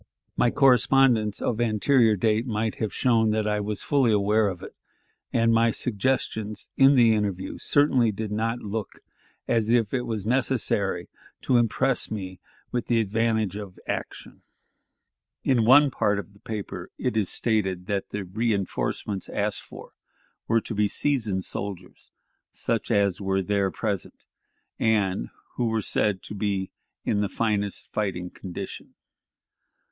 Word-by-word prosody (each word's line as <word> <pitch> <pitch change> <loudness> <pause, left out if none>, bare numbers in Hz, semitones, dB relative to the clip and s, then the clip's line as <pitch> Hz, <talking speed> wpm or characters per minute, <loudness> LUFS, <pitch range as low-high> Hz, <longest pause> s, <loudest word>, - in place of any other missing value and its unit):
My 120 - +3
correspondence 125 -4 +4
of 120 0 0
anterior 115 0 +3
date 110 +4 +1
might 110 -1 -1
have 110 - -1
shown 115 -3 +2
that 110 0 0
I 105 0 +1
was 105 0 -3
fully 135 -5 +3
aware 105 +1 +3
of 95 -3 -5
it, - - -10 0.6
and 115 0 +3
my 115 +1 +4
suggestions 110 -2 -2
in 135 +1 +6
the 115 -3 +6
interview 100 -3 -2
certainly 130 -6 +3
did 105 +1 -5
not 115 +3 -1
look 105 0 -4 0.5
as 115 -1 +1
if 115 -2 +2
it 125 -2 -1
was 110 -3 -3
necessary 110 -7 0 0.4
to 125 - +3
impress 125 +2 +1
me 95 -4 -6 0.3
with 120 - -2
the 120 -1 +2
advantage 110 -1 0
of 100 -3 -8
action. - - -5 1.0
In 120 -4 +2
one 140 +4 +7
part 105 -4 +1
of 100 0 -7
the 100 - -21
paper 105 -2 -6
it 125 -3 -2
is 105 -4 +1
stated 95 -6 0
that 100 0 -2
the 105 - -4
reënforcements 100 -1 -2
asked - - -2
for - - -12 0.6
were 115 0 +3
to - - -6
be 105 0 +2
"seasoned 110 -7 0
soldiers," 95 -2 -6 0.4
such 115 -2 -2
as 100 -4 +2
were 95 0 0
there 100 0 +1
present, 100 -2 -4 0.5
and 100 - +1 0.3
who 120 - +1
were 110 0 0
said 105 -3 0
to - - -7
be 100 -2 -2 0.3
in 105 - +1
the 100 - 0
"finest 105 -3 -2
fighting 90 -4 -2
condition." 90 -2 -8
110 Hz, 145 wpm, -25 LUFS, 100-115 Hz, 1.0 s, one